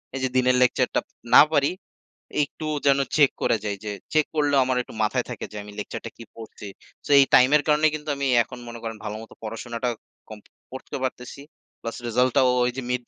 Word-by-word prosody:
এই - - -3
যে 130 - +1
দিনের 125 0 +3
lecture 125 - +2
টা - - +1 0.3
না - - +11
পারি, 145 +1 +3 0.7
একটু 155 +2 -5 0.2
যেন 140 0 +5 0.2
check 145 -3 +5
করে 115 - +2
যাই 100 -1 -2
যে, 105 - -3 0.2
check 155 -1 +3
করলেও 145 -2 +2
আমার 130 0 0
একটু - - -14
মাথায় 120 +3 0
থাকে 120 - -6
যে 105 - -9
আমি 105 0 -11
lecture 105 - -6
টা - - -5
কি 115 - -11
পড়ছি। 110 -2 -10 0.4
so - - -9
এই 140 - +8
time 130 +2 +7
এর 145 - +2
কারণেই 150 +1 +4
কিন্তু 150 0 -7
আমি 140 0 -2 0.2
এখন 125 +2 -11
মনে 115 0 -8
করেন, 115 -1 -5
ভালোমতো 110 +1 -7
পড়াশুনাটা 115 +2 -4 0.4
কম 110 -1 -9 0.3
পড়তেও 130 0 -7
পারতেছি। 130 +1 -5 0.4
plus 115 - -6
result 125 +2 +2
টাও, 130 -1 +5 0.2
ওই 125 - +1
যে 130 - -3
mid 125 0 -1
125 Hz, 210 wpm, -24 LUFS, 115-140 Hz, 0.7 s, না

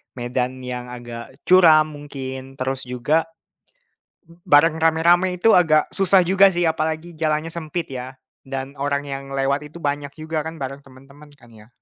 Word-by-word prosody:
medan 125 +1 -3
yang 125 -1 -5
agak 120 0 -9
curam 160 -4 +5
mungkin, 135 -2 -8
terus 130 -1 -3
juga 145 +7 0 1.2
bareng 155 +2 +5
rame-rame 170 +3 +3
itu 225 +5 +4
agak 155 -4 +3
susah 195 -1 +4
juga 195 +2 +5
sih, 175 -2 0
apalagi 160 +1 -2
jalannya 155 0 -1
sempit 170 0 -4
ya, 130 +1 -7 0.3
dan 135 +1 -5
orang 140 0 -1
yang 135 -1 -5
lewat 140 +1 0
itu 170 - -12
banyak 145 0 -2
juga 155 0 -3
kan 160 +2 -7
bareng 135 0 -6
temen-temen, 140 +2 -17
kan 120 -3 -19
ya. 105 0 -16
145 Hz, 150 wpm, -21 LUFS, 130-160 Hz, 1.2 s, curam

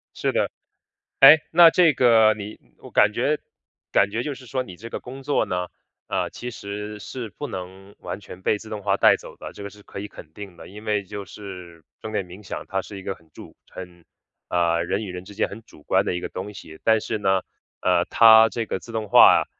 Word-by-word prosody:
是 - - -1
的， - - 0 0.7
诶， 150 +3 +10
那 170 0 +8
这 165 -2 +4
个 115 -4 +5
你 105 +1 -8 0.2
我 - - -13
感 105 0 +4
觉 145 +6 0 0.5
感 100 0 +3
觉 115 +3 -2
就 150 - -3
是 130 -1 -13
说 130 +1 -2
你 95 -8 -9
这 115 +6 -10
个 - - -5
工 135 +2 -10
作 145 - +1
呢， 90 -1 -2 0.4
呃， - - -1
其 125 - -7
实 105 0 -7
是 120 +2 -7
不 145 +8 -7
能 95 0 -9
完 - - -6
全 95 -2 -12
被 105 - +1
自 110 +1 -12
动 105 -2 -6
化 100 0 +1
带 - - +6
走 - - -12
的， - - -9
这 100 - -10
个 100 - -6
是 105 +1 -17
可 100 - -9
以 105 - -6
肯 - - -13
定 100 -4 -10
的。 - - -12
因 105 +3 -12
为 105 -2 0
就 100 +1 -7
是 90 -4 -11 0.2
正 110 - -6
念 100 -3 -2
冥 90 +4 -13
想 - - -6
它 95 0 -2
是 100 - -10
一 95 - -9
个 95 - -4
很 80 -1 -25
主 - - -13
很 90 -2 -11 0.5
呃， 85 -1 +1
人 100 +5 -2
与 95 - -6
人 90 0 -7
之 105 - -12
间 - - 0
很 110 +3 -10
主 75 - -18
观 - - +2
的 - - -1
一 90 - -2
个 - - -5
东 100 +3 -7
西， 80 -4 -11
但 110 -1 +4
是 - - -3
呢， 95 -2 +1 0.4
呃， - - +3
它 110 -1 +7
这 115 -1 -3
个 95 - -3
自 115 - -12
动 110 -2 -3
化 - - +7
啊， - - -19
105 Hz, 255 characters per minute, -23 LUFS, 95-115 Hz, 0.7 s, 诶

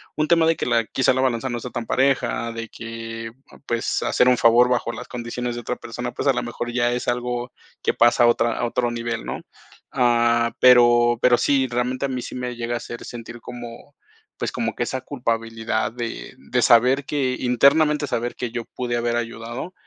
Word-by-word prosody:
un 155 +1 0
tema 165 0 +4
de 165 0 +3
que - - -3
la 115 -2 +2
quizá, 130 +2 +2
la 130 - 0
balanza 130 0 0
no 120 0 -3
sea 125 - -7
tan 120 -1 -4
pareja, 125 -3 0
de 115 -1 -6
que, 115 0 -7 0.3
pues, 115 -2 -1
hacer 125 - +3
un 125 - +4
favor 120 +2 +5
bajo 120 -1 0
las 125 - -8
condiciones 120 0 -4
de 120 - -5
otra - - -3
persona, - - -6
pues, - - -3
a - - +5
la - - -1
mejor 120 0 -5
ya 120 0 +1
es 125 - -2
algo 125 0 -2 0.3
que - - +1
pasa 120 0 +4
a - - +6
otra 120 0 +2
a - - -1
otro 120 +1 0
nivel, 115 -1 -4
¿no? - - -5 0.5
Ah, 120 -1 +2
pero, 120 -1 +6
pero 125 -1 +5
sí, 135 -2 +2
realmente 125 +2 -1
a - - -2
mí 125 -1 -3
sí - - -7
me 125 -1 -4
llega 120 0 -3
a - - 0
hacer 120 0 -8
sentir 120 0 -9
como, 120 +4 -10 0.4
pues, - - -3
como - - -3
que - - -1
esa 130 - -3
culpabilidad 115 -4 -2
de, 115 - -6
de - - -2
saber 125 +4 +4
que 130 -3 -1
internamente 145 +4 +3
saber 120 +1 -2
que 120 -2 -4
yo 120 -1 -4
pude 120 -1 -3
haber 120 0 0
ayudado. 120 +7 -5
120 Hz, 210 wpm, -22 LUFS, 115-125 Hz, 0.5 s, a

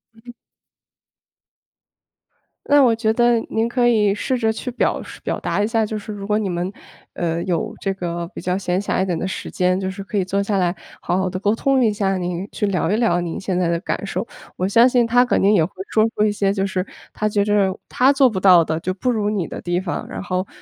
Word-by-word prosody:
嗯。 240 +2 -13 2.3
那 290 0 +5
我 240 -3 +4
觉 220 -1 +1
得 240 +1 +3
您 225 +1 0
可 240 0 +1
以 210 -4 +3
试 255 +4 -1
着 225 -2 +1
去 240 +3 -5
表 245 - 0
述 - - -11
表 - - -2
达 - - -1
一 205 - +1
下， 225 -1 +1
就 215 0 -4
是 210 +1 -7
如 200 -1 -7
果 210 +1 +1
你 210 - -2
们， 175 +1 -2 0.4
呃， 170 0 -2
有 175 -4 -2
这 195 -1 -1
个 170 -2 -4
比 - - -7
较 180 +1 -1
闲 185 -1 -1
暇 195 - -1
一 - - -1
点 175 -3 -2
的 - - -2
时 190 - -6
间， 180 0 +1
就 190 0 -2
是 195 +1 -8
可 200 +2 -4
以 195 - +2
坐 195 +2 -1
下 200 0 -1
来 175 -2 +1 0.3
好 180 - 0
好 190 -1 0
的 185 - -4
沟 205 +2 +1
通 265 +2 +2
一 220 - +3
下， 195 -2 0
您 180 +1 -3
去 - - -1
聊 180 -4 0
一 205 - +2
聊 220 -7 +2
您 170 -2 -4
现 185 -2 -2
在 180 - +1
的 170 0 +1
感 - - -3
受， - - -3 0.3
我 180 - -1
相 230 +6 +5
信 245 -2 +3
他 245 +2 +4
肯 245 - +1
定 200 +2 +4
也 180 -6 +4
会 185 - -11 0.2
说 220 0 +3
出 210 - +2
一 215 - +3
些 200 -1 0
就 195 -1 0
是 190 -1 -2 0.3
他 215 - -1
觉 205 -1 +1
着 200 -2 +1
他 265 +3 +4
做 270 -2 +5
不 200 -5 -3
到 185 -3 +6
的， 160 0 -2
就 185 +2 -2
不 250 +7 -1
如 210 -3 0
你 205 -5 -1
的 - - -7
地 175 0 -1
方， 180 - -4
然 - - -6
后 185 0 -2
200 Hz, 270 characters per minute, -21 LUFS, 185-220 Hz, 2.3 s, 到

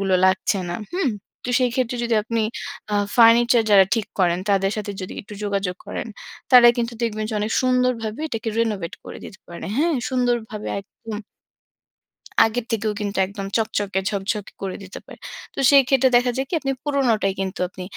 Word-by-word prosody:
গুলো 195 -1 +1
লাগছে 190 +1 +1
না, 175 - -2 0.2
হুম? 345 -9 +1 0.4
তো - - -1
সেই 250 -1 +2
ক্ষেত্রে 250 -1 -1
যদি 235 - +1
আপনি 230 0 -1 0.5
আ - - +2 0.2
ফার্নিচার 235 0 +6
যারা 195 -2 +8
ঠিক 225 -3 -1
করেন 175 -2 +3
তাদের 195 0 +2
সাথে 205 -1 -4
যদি 185 - -6
একটু 210 - -11
যোগাযোগ 195 -3 -2
করেন, - - -4 0.4
তারা 245 -2 +9
কিন্তু 235 0 -1
দেখবেন 215 -2 -1
যে - - -3
অনেক 215 +2 -1
সুন্দরভাবে 250 -3 0
এটাকে 225 -3 -4
রেনোভেট 205 -6 -1
করে - - -8
দিতে 190 - -11
পারে। 170 - -8
হ্যাঁ, 325 +3 +2
সুন্দরভাবে 240 -4 -1
একদম 215 +2 -9 1.3
আগের 225 +1 -2
থেকেও 220 -1 0
কিন্তু 205 -1 -3
একদম 195 +1 -7
চকচকে, 205 -3 -1
ঝকঝকে 200 +1 -3
করে 190 -1 -3
দিতে 190 - -9
পারে। - - -13 0.3
তো - - -7
সেই 280 -1 +8
ক্ষেত্রে 265 -1 +4
দেখা 245 0 +1
যায় 265 - 0
কি - - -8
আপনি 270 -2 -2
পুরনোটাই 245 -9 +1
কিন্তু 190 0 -4
আপনি 185 0 -9
220 Hz, 175 wpm, -22 LUFS, 195-245 Hz, 1.3 s, তারা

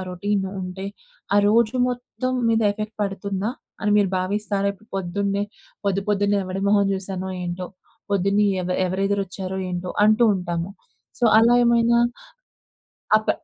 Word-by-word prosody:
Routine 195 +2 -1 0.2
ఉంటే, 185 +1 -6 0.5
ఆ - - +5
రోజు 225 +3 +3
మొత్తం 250 +1 -3 0.2
మీద 225 0 +3
ఎఫెక్ట్ 215 +1 -6
పడుతుందా, 200 +1 -2 0.3
అని 210 - 0
మీరు 200 -3 +3
భావిస్తారా? 200 +1 -1
ఇప్పుడు 215 +3 -22
పొద్దున్నే, 200 +2 -1 0.4
పొద్దు 195 0 +1
పొద్దున్నే 205 0 +2
ఎవడి 185 +1 -4
మొహం 200 -1 +4
చూశానో 190 -1 -4
ఏంటో 175 +1 -4 0.4
పొద్దున్నే 200 +1 +2 0.2
ఎవ 180 - -4 0.2
ఎవరెదరు 195 +2 0
వచ్చారో 190 0 -5
ఏంటో, 180 0 -4 0.2
అంటూ 215 +2 +4
ఉంటాము. 175 -1 -3 0.5
సో, 240 - +3
అలా 235 +2 +5
ఏమైనా 235 0 +4 1.2
అప్ 215 - -1
200 Hz, 135 wpm, -23 LUFS, 190-210 Hz, 1.2 s, ఆ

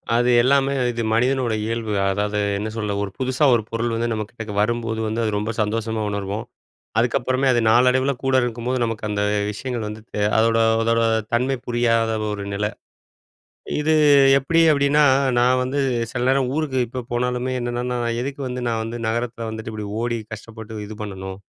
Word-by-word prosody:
அது 120 +1 +3
எல்லாமே 140 +1 +3 0.2
இது 120 -1 -3
மனிதனோட 125 0 +1
இயல்பு. 115 -2 -2 0.2
அதாவது, 105 +1 -1 0.2
என்ன 105 +2 -3
சொல்ல? 105 -2 -2
ஒரு 100 - -5
புதுசா 130 +2 0
ஒரு 115 - 0
பொருள் 115 0 -1
வந்து 115 +1 -1
நம்ம 110 -1 -1
கிட்டக 115 -3 -8
வரும்போது 115 0 -1
வந்து 110 +2 -2
அது 110 - 0
ரொம்ப 105 +2 -2
சந்தோஷமா 110 +1 -1
உணர்வோம். 100 +2 -3 0.5
அதுக்கப்புறமே 130 +3 +1
அது 120 - +3
நாளடைவில 125 +4 +4
கூட 135 0 +2
இருக்கும்போது 120 +2 -2
நமக்கு 115 -2 -3
அந்த 105 -1 -1 0.3
விஷயங்கள் 120 +1 -4
வந்து 105 +1 -7
த - - -2 0.2
அதோட 115 0 +3 0.2
அதோட 115 0 +2 0.3
தன்மை 130 +3 +2
புரியாத 115 -1 +2 0.2
ஒரு 100 -1 -4
நிலை. 105 +1 -1 1.1
இது 155 +1 +2 0.4
எப்டி 165 +5 +2
அப்டின்னா 145 +1 +3 0.4
நான் 125 +1 +3
வந்து 135 +3 -2 0.3
சில 125 -1 -2
நேரம் 135 0 +2
ஊருக்கு 150 -4 -1
இப்போ 125 +2 -5
போனாலுமே 125 +1 -1
என்னன்னா" 120 0 -3
நான் 120 -1 -1
எதுக்கு 140 +2 -5
வந்து 125 0 -4
நான் 115 -1 -1
வந்து 115 +1 -5
நகரத்தில 115 +1 -2
வந்துட்டு 110 0 -6
இப்படி 105 -1 -5 0.2
ஓடி 120 0 -1
கஷ்டப்பட்டு 110 0 -8
இது 110 +1 -8
பண்ணணும்?" 95 -2 -6
115 Hz, 165 wpm, -22 LUFS, 110-125 Hz, 1.1 s, நாளடைவில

